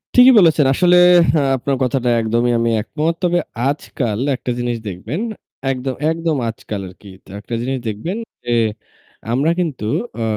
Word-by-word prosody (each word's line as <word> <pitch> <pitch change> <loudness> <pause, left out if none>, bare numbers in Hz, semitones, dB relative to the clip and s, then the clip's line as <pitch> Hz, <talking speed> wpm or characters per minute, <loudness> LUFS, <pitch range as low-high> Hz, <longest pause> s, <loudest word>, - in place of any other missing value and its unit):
ঠিকই 250 +1 +8
বলেছেন। 160 -5 +4
আসলে 180 +4 +4 0.4
আ - - +2 0.2
আপনার 135 +2 -1
কথাটা 125 -1 0
একদমই 120 +2 +1
আমি 115 0 +1
একমত। 160 +8 -2
তবে 175 0 +2 0.3
আজকাল 120 -6 -3 0.2
একটা 125 - -4
জিনিস 120 -1 -1
দেখবেন 105 - -5 0.5
একদম 130 0 -3 0.2
একদম 165 -2 -1
আজকাল 110 -2 -6
আরকি। 95 +2 -14 0.2
তা - - -19
একটা 105 - -8
জিনিস 130 +2 -2
দেখবেন 110 - -4 0.3
যে 120 - -2 0.8
আমরা 140 +6 +2
কিন্তু 155 -11 -2 0.4
অ - - 0
130 Hz, 150 wpm, -18 LUFS, 115-165 Hz, 0.8 s, ঠিকই